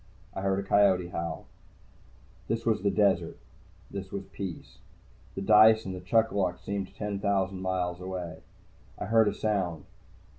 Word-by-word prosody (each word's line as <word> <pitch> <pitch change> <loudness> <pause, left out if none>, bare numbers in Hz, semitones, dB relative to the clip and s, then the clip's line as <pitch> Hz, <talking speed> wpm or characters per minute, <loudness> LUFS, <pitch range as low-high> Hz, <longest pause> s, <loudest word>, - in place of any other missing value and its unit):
I 95 - -4
heard 95 0 +1
a 100 - -6
coyote 95 -4 +4
howl. 85 -2 -4 1.0
This 115 +1 -2
was 110 -4 +1
desert. 100 -4 +2 0.5
This 95 -1 -6
was 100 -1 -4
peace. 95 -4 -7 0.6
The 95 - -4
dice 110 +2 +6
and 95 -1 -6
chuck 115 +4 +2
a - - -7
luck 90 -3 0
seemed 100 -1 -5
ten 105 -2 -3
thousand 95 -2 0
miles 90 -1 -2
away. 90 -3 -5 0.6
I - - -4
heard 110 -1 +4
a - - +1
sound. 95 -7 -1
95 Hz, 150 wpm, -28 LUFS, 90-105 Hz, 1.0 s, dice